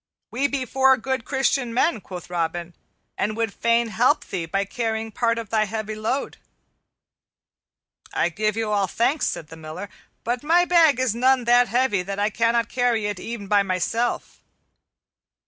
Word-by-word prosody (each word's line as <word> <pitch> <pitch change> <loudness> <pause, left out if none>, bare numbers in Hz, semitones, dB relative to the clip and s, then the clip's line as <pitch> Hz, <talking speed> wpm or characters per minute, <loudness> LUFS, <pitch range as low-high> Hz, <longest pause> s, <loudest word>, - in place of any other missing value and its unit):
"We 270 +4 +1
be 275 -2 -2
four 265 +1 +4
good 260 0 -3
Christian 265 -3 0
men," 250 -4 +2
quoth 180 -2 -9
Robin, 170 0 -3 0.5
"and 215 +2 -1
would 225 -3 -1
fain 235 0 +1
help 255 +7 +2
thee 175 -4 -4
by 195 +4 -1
carrying 225 +1 -3
part 230 +1 0
of 230 -3 -6
thy 215 -1 +2
heavy 215 +1 -4
load." 220 +6 -3 1.7
"I - - +1
give 215 +4 -1
you 220 -1 -1
all 200 -2 +1
thanks," 260 - +1
said 155 - -4
the 160 - -11
Miller, 160 +5 -8 0.3
"but 240 +1 -2
my 340 +4 +3
bag 330 -7 +4
is 255 -4 +1
none 255 +2 +3
that 245 +1 +4
heavy 240 -5 +1
that 195 +2 -5
I 205 +1 0
cannot 230 +1 +1
carry 245 -4 0
it 205 -2 -3
e'en 230 -1 -6
by 205 0 +3
myself." 195 +5 -2
225 Hz, 165 wpm, -23 LUFS, 200-250 Hz, 1.7 s, four